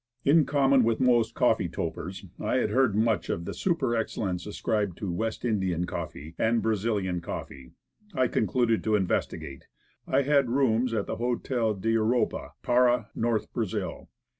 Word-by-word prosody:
In 150 +2 +5
common 140 -2 +4
with 115 0 +1
most 120 -3 +3
coffee - - +2
topers, 95 +3 -5
I 105 - -1
had 130 - +1
heard 130 -6 +3
much 110 0 +1
of 85 - -2
the - - -4
super 145 -10 0
excellence 100 -5 -2
ascribed 105 -3 -1
to 100 -4 -3
"West 110 +7 -3
India 95 -7 0
coffee" 80 -2 -6
and 115 +1 +2
"Bra 110 - +2
zilian 100 -4 -1
coffee.' 65 -5 -7 0.4
I 130 -2 +3
concluded 115 +1 +1
to 110 -1 +2
investigate. 90 -7 -2 0.4
I 140 - +2
had 140 -2 +3
rooms 125 -2 +2
at 105 - -1
the - - -4
Hotel 120 -2 -1
d'Europe, 115 +4 +1 0.3
Para, 120 -2 +3
North 115 -2 -1
Brazil. 110 -6 -3
115 Hz, 155 wpm, -27 LUFS, 100-125 Hz, 0.4 s, In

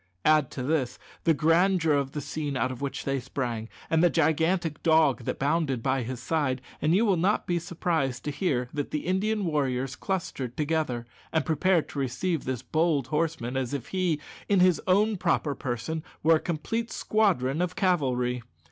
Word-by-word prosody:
Add 155 -3 +4
to 130 - -2
this 130 -3 0 0.3
the 165 - +5
grandeur 165 +1 +3
of 140 -1 0
the 150 - -3
scene 145 0 -3
out 130 0 0
of 130 - -8
which 140 -1 -4
they 135 -1 0
sprang, 120 -3 -4 0.2
and 160 +1 +2
the 175 - +6
gigantic 160 0 +1
dog 155 -7 +3
that - - -2
bounded 140 -4 0
by 135 0 +1
his 125 +1 -4
side, 130 -2 0 0.2
and 155 +3 +3
you 220 +4 +4
will 195 -4 +3
not 190 +5 +1
be 175 -1 0
surprised 160 -6 -2
to 150 - -1
hear 140 -7 0
that 145 -1 -2
the 150 - -3
Indian 200 +3 0
warriors 135 -4 -1
clustered 140 -10 -3
together, 150 -6 -1 0.3
and 160 -4 +1
prepared 165 +2 +2
to 145 - -5
receive 140 +6 -1
this 130 -3 -3
bold 155 -5 +1
horseman 150 -5 -1
as 130 +1 -1
if 135 - -6
he, 180 -5 0 0.3
in 200 -2 +4
his 180 -2 +4
own 205 +3 +3
proper 165 -4 +1
person, 130 +5 -3 0.2
were 160 +1 +6
a - - -5
complete 225 +9 -3
squadron 175 - +1
of 180 0 -1
cavalry. 125 -9 +1
155 Hz, 185 wpm, -27 LUFS, 130-175 Hz, 0.3 s, the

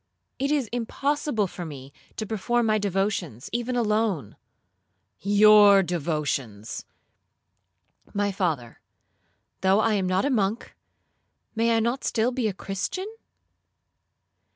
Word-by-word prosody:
It 275 +1 0
is 290 -3 +1
impossible 245 0 -1
for 180 -1 -7
me 140 -4 -9 0.2
to 215 - -4
perform 225 +3 0
my 215 -1 +2
devotions 195 - -2
even 240 +1 -1
alone.'—'Your 205 - +2
devotions!'—'My 150 - -5
father, 160 - -2 0.8
though 190 +2 +4
I 220 0 +2
am 195 -3 0
not 185 +4 +1
a 285 - +1
monk, 215 -2 -1 0.8
may 230 +1 +2
I - - +3
not 235 +4 -1
still 230 +2 +1
be 250 -3 -1
a - - 0
Christian?' 285 - -4
205 Hz, 105 wpm, -25 LUFS, 180-230 Hz, 0.8 s, though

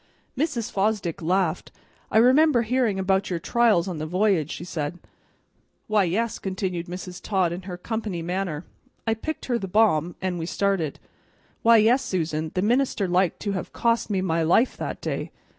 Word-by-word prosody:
Mrs. 265 -5 -1
Fosdick 195 -4 -1
laughed. 180 0 0 0.4
"I - - +2
remember 255 +2 +5
hearin' 235 -3 +1
about 190 0 +1
your 180 - -1
trials 210 -1 +2
on 175 -4 -4
the 155 - -3
v'y'ge," 180 -3 +1
she - - -6
said. 160 -2 -4 0.9
"Why, 215 -2 +2
yes," 220 +7 -1
continued 185 -3 -3
Mrs. 180 0 -7
Todd 190 -4 +1
in 175 - -5
her 180 - -5
company 210 -3 -4
manner. 175 -2 -3 0.4
"I 225 - +2
picked 310 +8 -5
her 240 -2 0
the 195 - -4
balm, 180 -5 +2
an' 185 -2 -2
we 165 - -3
started. 190 -7 0 0.6
Why, 230 0 +6
yes, 235 +5 +4
Susan, 160 -3 -2
the 185 - +1
minister 240 -3 +1
liked 180 -1 +1
to 205 - -1
have 190 -2 -4
cost 230 -1 +1
me 195 -3 0
my 165 -3 0
life 180 +10 +3
that - - -5
day. - - -3
190 Hz, 175 wpm, -25 LUFS, 175-225 Hz, 0.9 s, Why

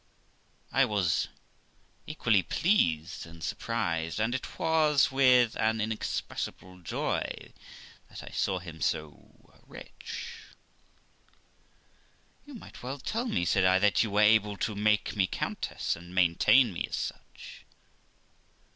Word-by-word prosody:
I 135 - +4
was 100 -8 +1 0.8
equally 115 -10 +2
pleased 85 - 0
and 85 0 -12
surprised, 85 +2 -2
and 110 +3 0
it 130 - -5
was 155 -4 +3
with 125 -3 +4
an 110 0 +1
inexpressible 105 -3 -4
joy 85 - -3 0.6
that - - -10
I - - -10
saw 95 -2 0
him 85 -3 -9
so 75 -1 -4
rich. - - -9 2.1
'You 290 - -10
might 230 - -12
well 130 +3 -5
tell 225 - -3
me', 85 - 0
said 95 +2 +2
I, 95 0 +5
'that 105 +1 +3
you 110 - 0
were 100 +1 +2
able 105 -1 +4
to 110 - -2
make 105 +1 +1
me 95 -2 +2
countess, - - -3
and 85 +2 -12
maintain 95 +7 +4
me 85 - -3
as - - -3
such.' - - -8
105 Hz, 125 wpm, -29 LUFS, 90-125 Hz, 2.1 s, I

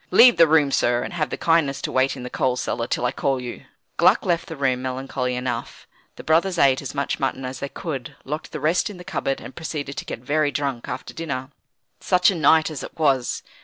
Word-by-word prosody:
Leave 245 -5 +7
the 165 -1 +7
room, 150 -3 +4
sir; 120 -2 +2
and - - -6
have 155 -3 -1
the - - -4
kindness 165 -5 +2
to - - -4
wait 130 +1 +1
in 125 - -7
the 125 - -5
coal 130 -1 +1
cellar 120 -2 -2
till 125 - -1
I 125 - +1
call 135 0 0
you." 125 -1 -7 0.3
Gluck - - +4
left 170 +1 0
the 165 - -6
room 130 -3 0
melancholy 130 0 -3
enough. 125 0 -4 0.3
The - - -10
brothers 170 +3 +2
ate 135 -4 +4
as 140 - -7
much 140 0 -1
mutton 135 -1 -2
as 130 -1 -5
they 140 - -4
could, 135 -8 -6
locked 150 +3 -5
the 155 - -5
rest 160 +8 +1
in 205 - -9
the 180 - -10
cupboard, 135 -5 -2
and 130 - -10
proceeded 145 -3 -5
to - - -4
get - - -5
very 145 +5 0
drunk 140 -4 -3
after 125 - -6
dinner. 140 -5 -4 0.5
Such 180 +1 +3
a - - -3
night 160 0 +4
as 145 -5 -5
it - - -9
was! 135 -6 +1
140 Hz, 235 wpm, -23 LUFS, 130-160 Hz, 0.5 s, Leave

